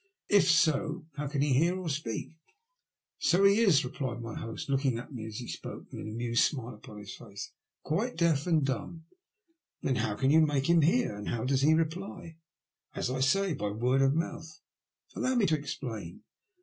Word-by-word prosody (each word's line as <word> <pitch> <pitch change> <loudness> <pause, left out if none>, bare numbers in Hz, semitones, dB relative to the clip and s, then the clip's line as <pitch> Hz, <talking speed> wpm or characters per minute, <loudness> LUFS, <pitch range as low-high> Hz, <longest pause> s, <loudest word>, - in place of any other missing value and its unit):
'* - - -46
If 185 - +3
so, 165 0 +2
how 150 0 -4
can 140 0 0
he 145 -2 +2
hear 170 +7 +3
or 185 - -5
speak? 140 -4 -3 0.5
" - - -59
So 180 +3 +3
he 200 +2 +6
is," 190 - +4
replied 125 -1 -4
my 115 -2 -6
host, 115 0 -6
looking 135 -3 +1
at 125 +5 -8
me 110 -3 -6
as 110 -1 -7
he 120 - -6
spoke, - - -8
with - - -7
an - - -6
amused 120 +1 +1
smile 125 -4 -1
upon 105 0 -12
his 105 -1 -8
face. 100 -4 -9 0.2
" - - -62
Quite 215 +11 -1
deaf 165 -3 +2
and 160 -5 +3
dumb." 140 +6 -4 0.8
Then 130 - +1
how 110 -2 -1
can 135 +6 +2
yon 155 0 +6
make 140 -2 0
him 170 -1 +5
hear. 175 - +2
And 105 0 -5
how 115 -2 -2
does 135 0 +2
he 155 +3 +5
reply? 165 0 -3 0.3
" - - -63 0.2
''As 125 - -1
I - - -2
say, 190 +8 +2
by 105 -7 -2
word 125 +6 +1
of 135 +1 +3
mouth. 160 -1 -4 0.5
Allow 260 0 0
me 235 -4 +3
to 160 -4 +3
explain. 125 - -6
140 Hz, 210 wpm, -30 LUFS, 120-165 Hz, 0.8 s, he